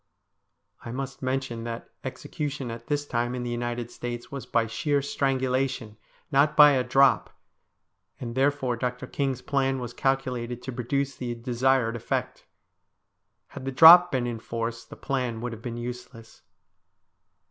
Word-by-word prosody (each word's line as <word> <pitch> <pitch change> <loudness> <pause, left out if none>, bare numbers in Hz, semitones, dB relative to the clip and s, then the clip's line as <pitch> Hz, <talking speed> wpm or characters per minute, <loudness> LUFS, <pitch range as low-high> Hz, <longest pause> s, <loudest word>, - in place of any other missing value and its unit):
I 115 - -6
must 135 +2 -5
mention 130 -3 -2
that 115 0 -6
execution 145 -4 -5
at 115 0 -9
this 145 -1 -1
time 120 -2 -1
in 125 - -4
the 120 - -3
United 120 0 -3
States 120 0 -6
was 140 -2 -6
by 115 -1 +2
sheer 140 +6 0
strangulation, 130 -4 -1 0.4
not 145 +2 +3
by 150 -1 +9
a 130 -2 +2
drop, 135 +1 +3 0.8
and 120 -2 -5
therefore 135 -1 +1
Dr. 125 +1 -3
King's 135 -1 -2
plan 135 -1 0
was 120 -2 -6
calculated 125 -3 -1
to 130 - -5
produce 135 +3 -2
the 120 -2 -4
desired 120 0 +1
effect. 120 - -3 1.0
Had - - -9
the 135 - -2
drop 170 +6 +9
been 130 -4 0
in 120 -2 -3
force 115 0 -4
the - - -11
plan 125 -4 -2
would 125 +1 -4
have 115 - -9
been 120 -1 -5
useless. 120 -1 -8
125 Hz, 150 wpm, -26 LUFS, 120-135 Hz, 1.0 s, by